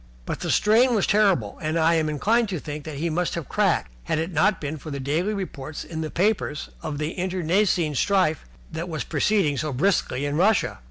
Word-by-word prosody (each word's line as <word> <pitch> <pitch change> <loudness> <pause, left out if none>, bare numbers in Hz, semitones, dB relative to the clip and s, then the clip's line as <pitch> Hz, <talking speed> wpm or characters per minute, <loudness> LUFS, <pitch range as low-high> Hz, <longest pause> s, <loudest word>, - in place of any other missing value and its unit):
But - - -4
the - - -4
strain 235 +4 +4
was 210 - +2
terrible 195 - +2
and 155 +1 -1
I 165 +1 +4
am 160 -2 +1
inclined 220 - +1
to 185 - -2
think 150 0 -7
that 155 -3 -6
he 165 +3 -1
must 175 +2 -1
have 170 -5 -5
cracked, - - +1
had - - 0
it 165 +3 -2
not 185 +6 +2
been 150 +1 -4
for 155 - -9
the 140 -1 -4
daily 155 +9 0
reports 160 -8 -5
in 160 -1 -6
the 155 - -3
papers 185 -5 0
of 150 -2 -4
the 150 +2 -2
internecine 180 -2 +1
strife 180 +1 +1 0.3
which 165 +2 -4
was 160 -3 -3
proceeding 195 -10 +1
so 155 -1 -2
briskly 140 -2 +1
in 145 +1 -1
Russia. 200 +4 +2
160 Hz, 210 wpm, -24 LUFS, 150-195 Hz, 0.3 s, strain